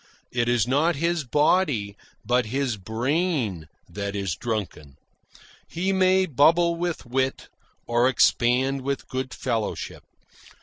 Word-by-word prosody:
It 120 -1 0
is 120 -1 +2
not 150 +6 +2
his 165 +1 -1
body 145 - +1 0.3
but 120 0 +1
his 130 0 -1
brain 115 - -1 0.2
that 100 0 -5
is 95 -4 -2
drunken. 95 - -5 0.7
He 185 +3 -1
may 190 0 +3
bubble 170 +3 +3
with 175 -3 -3
wit, 130 +2 -2 0.4
or 120 +2 +2
expand 130 +2 +2
with 140 +1 -3
good 130 0 -4
fellowship. 115 -5 -3
130 Hz, 120 wpm, -24 LUFS, 115-160 Hz, 0.7 s, may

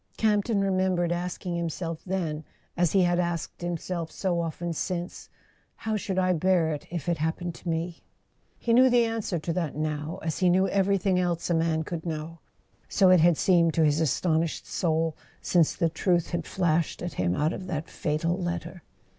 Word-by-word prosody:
Campton 210 -1 +2
remembered 185 -3 +1
ask¬ 175 +2 -3
ing 175 -1 -2
himself 165 -1 -3
then, 170 -5 -2 0.3
as 175 -2 +1
he 195 -2 +5
had 175 0 +2
asked 170 -2 -3
himself 175 -1 -3
so 180 -3 -1
often 170 +1 -3
since: 175 +2 -4 0.5
"How 220 -1 -3
should 195 -2 -3
I 185 -1 +3
bear 175 -1 +2
it 150 - -7
if 170 -3 -5
it 170 -2 0
happened 165 +2 -2
to 170 - -7
me?" 165 +1 -3 0.6
He 230 - 0
knew 255 +2 +7
the 240 -1 +4
answer 225 -5 -2
to 165 +1 -3
that 165 -4 -2
now, 155 +2 -3
as 160 -2 -2
he 185 - +4
knew 190 +2 +3
every¬ 195 0 +2
thing 185 -1 +1
else 175 -1 -1
a - - +4
man 160 -1 +1
could 165 0 -5
know: 165 0 -5 0.5
so 190 -2 +5
it 185 - +7
had 170 0 +5
seemed 170 -3 +3
to 160 - +4
his 150 0 +2
astonished 160 +1 0
soul 160 -2 0 0.2
since 170 -4 +2
the 165 - +2
truth 175 +1 0
had 170 -2 -2
flashed 170 -3 0
at 175 - -4
him 90 -1 0
out 155 +3 +1
of 185 - -6
that 160 -3 -3
fatal 155 +3 -1
letter. 175 0 -4
175 Hz, 190 wpm, -27 LUFS, 160-185 Hz, 0.6 s, knew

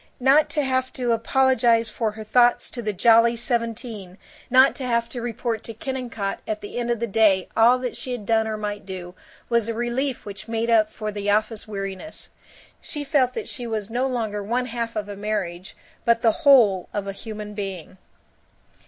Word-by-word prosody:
Not 270 +4 +4
to 295 - 0
have 260 -1 0
to 245 -2 -1
apologize 235 -1 +3
for 220 -1 -2
her 220 0 -8
thoughts 240 +3 +3
to 240 - -5
the 215 -2 -1
Jolly 230 +4 +5
Seventeen, 230 -5 -3 0.3
not 260 +2 +6
to 270 - -5
have 235 -1 +1
to 245 - -6
report 230 -1 -3
to 230 - -7
Kennicott 240 -5 -4
at 215 -1 -3
the 205 +4 -5
end 240 0 -2
of 235 -2 0
the 235 - 0
day 200 -4 +3
all 235 +3 +6
that 250 -1 -4
she 255 - -5
had 240 -4 -4
done 220 0 +2
or 215 -1 -3
might 205 -1 -4
do, 185 -2 -7 0.3
was 235 -2 +1
a 230 - -2
relief 240 +3 -2
which 205 +1 -8
made 230 +1 -1
up 215 -2 +4
for 215 -1 -5
the 205 0 -3
office 215 +1 0
weariness. 195 +6 -6 0.5
She 295 -3 -4
felt 270 -4 +1
that 445 - -4
she 245 -2 -4
was 220 -2 -3
no 250 +3 0
longer 220 -5 -2
one 240 +5 -1
half 230 -1 -4
of 210 -1 -3
a 205 - -6
marriage 195 -3 -4 0.3
but 235 -1 +2
the 225 - +6
whole 235 - +5
of 205 -1 -2
a 200 - -3
human 210 0 -7
being. 195 -3 -6
230 Hz, 195 wpm, -23 LUFS, 210-245 Hz, 0.5 s, not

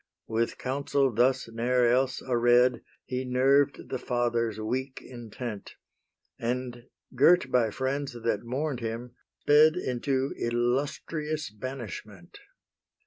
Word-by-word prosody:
With 115 +1 -1
counsel 135 0 0
thus 125 +3 +2
ne'er 120 +2 +1
else 130 +2 +1
aread 120 0 +3 0.2
He 130 0 -3
nerved 130 +2 +2
the 130 - -3
fathers' 120 -3 -1
weak 130 +5 -3
intent, 120 -3 -8 0.6
And, 120 0 -3 0.3
girt 140 +1 +4
by 120 -3 +3
friends 135 +3 -2
that 115 -3 -1
mourn'd 130 +3 -3
him, 115 +1 -5 0.3
sped 155 +2 +6
Into 135 -3 -1
illustrious 140 +5 -1
banishment. 105 -6 -8
125 Hz, 105 wpm, -28 LUFS, 120-135 Hz, 0.6 s, sped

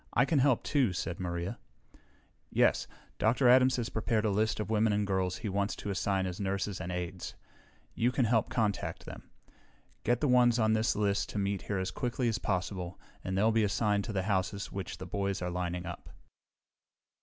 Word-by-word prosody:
"I - - +5
can 150 -1 +2
help, 130 -3 +3
too," 130 -10 +2
said 90 +1 -3
Maria. 85 +3 -3 0.9
"Yes. - - +2 0.3
Dr. 120 +4 +3
Adams 130 +1 +6
has 120 -2 -2
prepared 110 0 0
a 105 - +2
list 110 +3 +1
of 105 0 -3
women 110 0 +3
and 105 0 +1
girls 95 -2 0
he 115 - -5
wants 100 +1 -1
to 105 - -5
assign 95 0 0
as 90 +1 -4
nurses 100 -1 -2
and 90 0 -4
aides. 90 0 -5 0.6
You 120 +2 +1
can 125 -1 +1
help 115 -1 +2
contact 105 -5 -1
them. - - -10 0.7
Get 120 0 +2
the 150 - +1
ones 125 -2 +5
on 110 -2 +3
this 110 +1 +2
list 100 -1 0
to - - -5
meet 100 -1 -1
here 100 - 0
as 95 0 -2
quickly 125 0 -1
as 115 - 0
possible 90 -2 -3 0.2
and 95 0 -2
they'll 110 +3 +4
be 110 0 +3
assigned 105 0 +1
to 115 - -4
the 95 -3 -1
houses 100 0 -1
which 95 -1 -5
the 95 - -7
boys 100 +1 -2
are 90 0 -3
lining 90 0 -3
up." 85 0 -7
100 Hz, 195 wpm, -31 LUFS, 95-115 Hz, 0.9 s, Adams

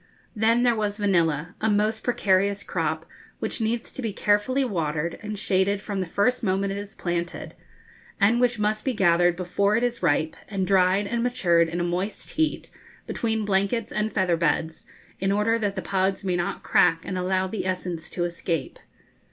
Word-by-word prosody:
Then 225 +3 +3
there 240 -2 +4
was 210 -1 -2
vanilla, 170 -6 +1
a 220 - +2
most 215 +1 +1
precarious 200 -4 +1
crop, - - -2 0.3
which - - -3
needs 230 +1 -1
to - - -6
be 225 -3 -2
carefully 210 +8 +1
watered 165 -6 -2
and 210 -1 -5
shaded 195 0 +1
from 200 -1 -4
the 185 - -2
first 250 +8 +1
moment 195 0 0
it 200 - -4
is 205 0 -8
planted, 175 -1 -3 0.7
and 220 +4 +4
which 245 -1 +2
must 215 0 0
be 265 - 0
gathered 175 -3 +4
before 200 +3 +1
it 230 - +1
is 240 -1 -1
ripe, 155 -1 +1
and 195 -2 -1
dried 190 +1 +3
and 235 +3 -1
matured 175 -9 +2
in 170 +2 -3
a - - 0
moist 180 +4 -2
heat, 315 -1 -1 0.3
between 220 -2 -1
blankets 200 +3 0
and 215 +1 -1
feather 185 -4 +1
beds, 160 -1 -1 0.3
in 195 +1 +1
order 215 +3 +2
that 205 -2 -1
the 190 - -4
pods 190 +1 0
may 180 -2 +1
not 175 0 -2
crack 165 -2 +3
and 185 - -4
allow 185 +1 0
the 190 0 -3
essence 180 -3 -3
to 175 - -2
escape. 170 -4 -3
195 Hz, 185 wpm, -25 LUFS, 175-215 Hz, 0.7 s, there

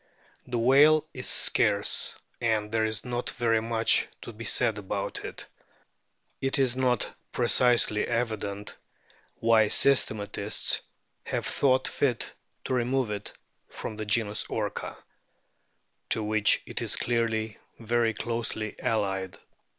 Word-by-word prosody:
The 125 -1 -2
whale 145 +6 +5
is 130 - -2
scarce, 105 -2 +2 0.3
and 110 -2 0
there 110 0 +1
is 110 +1 -1
not 120 0 -2
very 115 -2 +1
much 115 -1 +2 0.2
to 120 - -8
be 115 +2 -9
said 105 0 +1
about 95 - -4
it. - - -7 1.0
It 135 0 0
is 130 -3 +2
not 125 -3 +1 0.2
precisely 120 -4 +3
evident 110 -4 -3 0.6
why 115 -1 +3
systematists 105 -5 +1 0.5
have - - -3
thought 130 -1 +2
fit 125 -5 0 0.3
to - - -3
remove 125 -1 0
it 105 0 -4 0.4
from 110 - -6
the 110 0 -5
genus 105 -1 +1
Orca, - - -4 1.1
to 110 - +3
which 105 0 +3
it - - -2
is - - 0
clearly 115 -2 -1 0.2
very 115 -1 0
closely 115 -2 -3
allied. 95 -5 -2
115 Hz, 120 wpm, -27 LUFS, 105-120 Hz, 1.1 s, whale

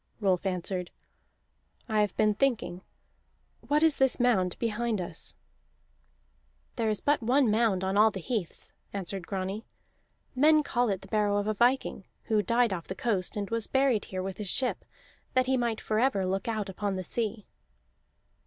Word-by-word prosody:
Rolf 190 -2 +1
answered: 180 -1 -3 1.0
"I 215 -2 +2
have 205 -3 -1
been 215 -1 +3
thinking. 225 -7 0 0.9
What 300 +2 +3
is 320 -3 +4
this 265 -1 +3
mound 195 -8 +2
behind 230 -1 -1
us?" 175 - -6 1.4
"There 230 -3 0
is 215 - 0
but 290 -2 +1
one 245 +1 +3
mound 215 -4 +2
on 190 +1 0
all 215 +1 +7
the 195 - -6
heaths," 190 -2 -4 0.2
answered 195 -2 -4
Grani. 195 +3 -4 0.7
"Men 305 +3 +5
call 245 -4 0
it 195 -2 -2
the - - -12
barrow 205 0 +1
of 205 - 0
a 215 - 0
viking, 240 -3 +1 0.2
who 215 -2 +1
died 230 +1 +2
off 170 -3 -6
the 190 - -5
coast, 205 -7 -1
and 200 0 -3
was 230 -2 -1
buried 265 -5 +2
here 185 -1 -4
with 190 -1 -5
his 210 -3 +1
ship, 255 +5 +3 0.5
that 255 0 +4
he 265 +1 +2
might 235 -3 0
forever 215 -3 +1
look 195 +3 -2
out 215 -3 -2
upon 195 +1 -3
the 185 - -3
sea." 220 +1 -2
215 Hz, 170 wpm, -29 LUFS, 195-240 Hz, 1.4 s, all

